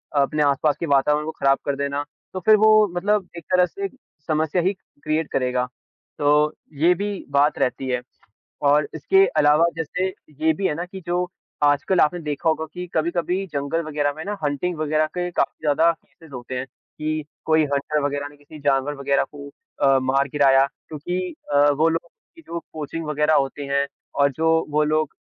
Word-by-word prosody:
अपने 145 +2 +2
आस-पास 145 +1 +2
के - - -2
वातावरण 150 +1 +2
को 160 - -3
खराब 135 0 +4
कर 140 - 0
देना, 140 +1 -2 0.3
तो 185 - -3
फिर 215 - +8
वो 215 0 +6
मतलब 200 +1 +1
एक 170 - -8
तरह 180 -1 +5
से 395 - -5 0.4
समस्या 155 +2 +1
ही 185 +3 +1 0.3
क्रिएट 155 0 0
करेगा, 125 -1 0 0.5
तो 150 +1 +3 0.2
ये 170 +5 +5
भी 200 +2 -4
बात 140 +1 +3
रहती 130 +1 -1
है। 125 -1 0 0.7
और 145 +1 +3
इसके 385 0 +4
अलावा 150 +3 +5
जैसे 165 +3 -2 0.4
ये 160 - +6
भी 190 +5 -1
है - - -1
ना 170 - -3
कि 190 +2 -9
जो 175 +1 +1 0.4
आजकल 145 +5 +3
आपने 165 +4 +3
देखा 150 +1 -1
होगा 160 0 0
कि 180 0 -5
कभी-कभी 170 +3 0
जंगल 140 +3 -1
वग़ैरह 145 -2 -1
में 160 - -5
ना 205 0 -3
हंटिंग 150 +5 -1
वग़ैरह 155 0 +1
के 180 0 -1
काफ़ी - - -1
ज़्यादा 160 +3 +4
केसेस 160 -1 -16
होते 125 +1 -6
हैं, 125 - -3
कि 155 +3 -5 0.2
कोई 160 0 +4
हंटर 145 +2 0
वग़ैरह 145 0 -1
ने 145 - -19
किसी 145 +1 -13
जानवर 140 0 +1
वग़ैरह 140 0 +1
को 140 0 -8 0.3
अ, 135 -1 +5
मार 135 +2 +1
गिराया 135 -2 +5 0.2
क्योंकि 175 +4 -4 0.2
अ, 145 +1 +6
वो 155 +3 +2
लोग 165 +1 -3 0.3
की 330 - -14
जो 170 - -5
कोचिंग 155 +1 -5
वग़ैरह 150 +1 +2
होते 135 +1 0
हैं 140 0 +2 0.3
और 140 0 +3
जो 160 +3 +2
वो 150 +1 +3
लोग 155 0 0
150 Hz, 190 wpm, -23 LUFS, 140-170 Hz, 0.7 s, फिर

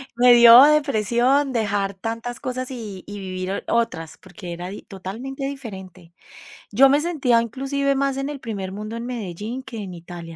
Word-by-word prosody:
Me 245 0 +6
dio 235 +1 +10
depresión 275 -1 +2
dejar 205 -4 -1
tantas 230 +4 -5
cosas 255 0 -4
y 210 -7 -7
y 205 0 -7
vivir 185 0 -4
otras, 165 -9 -1
porque 180 -4 -10
era 175 +1 -6
di 200 - -8
totalmente 230 +9 -7
diferente. 190 -10 -8 0.6
Yo 270 +6 +6
me 285 +2 +3
sentía 270 -9 +2
inclusive 275 +4 -1
más 275 0 0
en 275 +1 -3
el 290 -2 -6
primer 200 -6 -5
mundo 215 +3 -6
en 230 +1 -5
Medellín 230 +1 -5
que 235 - -9
en 195 -4 -6
Italia. 170 -1 -10
230 Hz, 170 wpm, -22 LUFS, 190-265 Hz, 0.6 s, dio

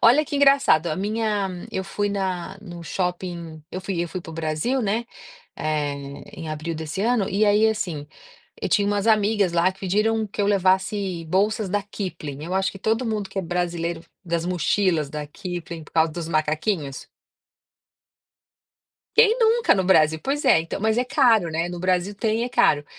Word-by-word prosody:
Olha 260 +7 +6
que 290 - -6
engraçado, 275 - +4
a 155 - -1
minha 210 -1 -1 0.2
eu 190 - -3
fui 205 +1 -2
na 190 -3 -3
no 175 -4 -9
shopping, 175 -2 -4
eu 185 - -4
fui 190 -2 -3
eu 175 - -4
fui 185 - -5
para 170 - -10
o - - -8
Brasil, 160 +11 -1
né, 220 +1 0 0.5
eh, 150 -2 -1 0.4
em 165 -2 -7
abril 155 +2 -4
desse 160 +4 -4
ano 230 -3 +2
e 205 +2 +2
aí, 210 +1 +4
assim, 175 -9 -3 0.6
eu - - +1
tinha 205 -1 +2
umas 205 0 0
amigas, 210 -4 +3
lá, 170 +2 +3
que 190 - -22
pediram 215 +4 +1
que 205 - -6
eu - - +1
levasse 190 -2 +1
bolsas 205 +3 +1
da 205 +2 0
Kipplin, 170 -8 -6
eu 180 +3 -4
acho, 190 0 +1
que 195 - -10
todo 225 +5 0
mundo 210 -3 -2
que 195 - -5
é 190 - 0
brasileiro 170 -1 -2 0.2
das 170 -1 -1
mochilas 180 -3 +1
da 150 0 -5
Kipplin 170 -1 -7
por - - -19
causa 160 0 +3
dos 170 0 -5
macaquinhos? 155 -1 -1 2.1
Quem 455 0 +6
nunca 460 0 +4
no 190 - +1
Brasil? 160 -4 +4
Pois 290 +2 -1
é, - - +6
então, 165 +3 -5
mas 220 +1 +1
é 245 - +2
caro, 230 - +3
né, 165 +2 -1
no 175 0 -6
Brasil 185 +2 0
tem, 220 +2 0
e - - +1
é - - -3
caro. 240 -12 +3
190 Hz, 190 wpm, -23 LUFS, 165-215 Hz, 2.1 s, Olha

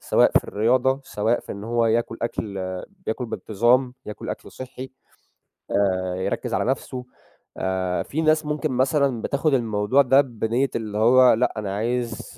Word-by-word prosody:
سواء - - +3
في - - -8
الرياضة، 130 +5 +1
سواء 110 +3 0
في - - -8
إن 100 +1 -8
هو 115 0 +1
ياكل 115 0 0
أكْل 105 -3 -3 0.5
ياكل 120 +2 -2
بانتظام، 120 +5 +1
ياكل 105 - -7
أكل - - -7
صحّي، 130 0 -8 0.8
آآ 95 -2 +1
يركّز 95 - -3
على - - +1
نفْسه 130 -1 -3 0.5
آآ، 95 -1 -1
في 160 +3 -3
ناس 155 0 +3
ممكن 150 -1 -2
مثلًا 130 -1 +1
بتاخُد 140 +1 0
الموضوع 115 +1 +2
ده 135 +1 +5
بنيّة 120 +1 -1
اللي 105 -2 -3
هو 125 +3 +6
لأ، 125 +3 +1
أنا 100 -2 -3
عايز 115 - -3
120 Hz, 155 wpm, -23 LUFS, 105-130 Hz, 0.8 s, هو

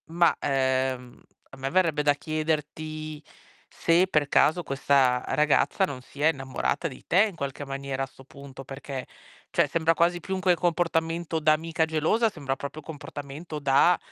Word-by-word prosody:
Ma, 170 +1 +3
ehm, 130 -2 -1 0.3
a 135 - -12
me 135 +1 -3
verrebbe 165 -3 +2
da 145 -1 +4
chiederti 155 0 -3 0.5
se 170 +3 +2
per 150 -6 +1
caso 160 +4 +3
questa 135 -3 +2
ragazza 150 +6 +2
non 135 -7 -7
sia 145 +4 -1
innamorata 135 +2 -1
di 130 - -13
te 195 +6 +4
in 195 - -12
qualche 140 -2 -5
maniera 135 -1 -3
a - - -1
'sto 135 - -17
punto, 135 0 -11
perché 135 -1 -6 0.5
cioè - - +3
sembra 165 +2 +2
quasi 170 +1 +2
più 190 +2 -3
che 185 0 0
un 180 - +6
comportamento 165 -1 0
da 155 0 +4
amica 160 +1 0
gelosa, 160 +9 +2
sembra 140 -8 -3
proprio 140 +3 -6
un 155 - -14
comportamento 145 +1 -7
da, 140 +5 +4
150 Hz, 165 wpm, -26 LUFS, 135-165 Hz, 0.5 s, un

